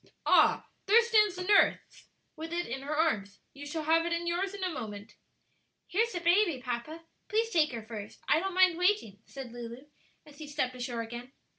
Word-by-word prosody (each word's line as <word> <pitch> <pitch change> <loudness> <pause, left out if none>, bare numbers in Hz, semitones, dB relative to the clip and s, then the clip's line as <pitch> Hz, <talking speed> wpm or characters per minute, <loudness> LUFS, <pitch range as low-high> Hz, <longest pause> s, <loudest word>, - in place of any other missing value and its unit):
"Ah, - - +4 0.2
there 455 +4 +6
stands 425 -4 +3
the 365 - -4
nurse 405 +2 +2 0.3
with 320 0 -7
it 345 +1 -1
in 265 +3 -5
her 290 +2 -3
arms. 205 -11 0
You 285 +1 -9
shall 315 +2 -4
have 325 +2 +3
it 340 - -3
in 340 0 -1
yours 370 +3 -1
in 395 - -6
a 370 - 0
moment." 210 -6 -7 0.7
"Here's 455 +5 0
the 350 - -2
baby, 345 -3 +3
papa; 250 +6 -5 0.3
please 450 +2 0
take 315 -5 +3
her 230 -3 -6
first; 215 -2 -8
I 305 - +4
don't 380 +1 -3
mind 370 -2 +4
waiting," 360 - +1
said 270 -3 -9
Lulu, 240 +2 -8 0.4
as 295 -1 -16
he 305 - -8
stepped 285 -3 -2
ashore 245 -2 -4
again. 240 +3 -9
315 Hz, 195 wpm, -30 LUFS, 245-365 Hz, 0.7 s, there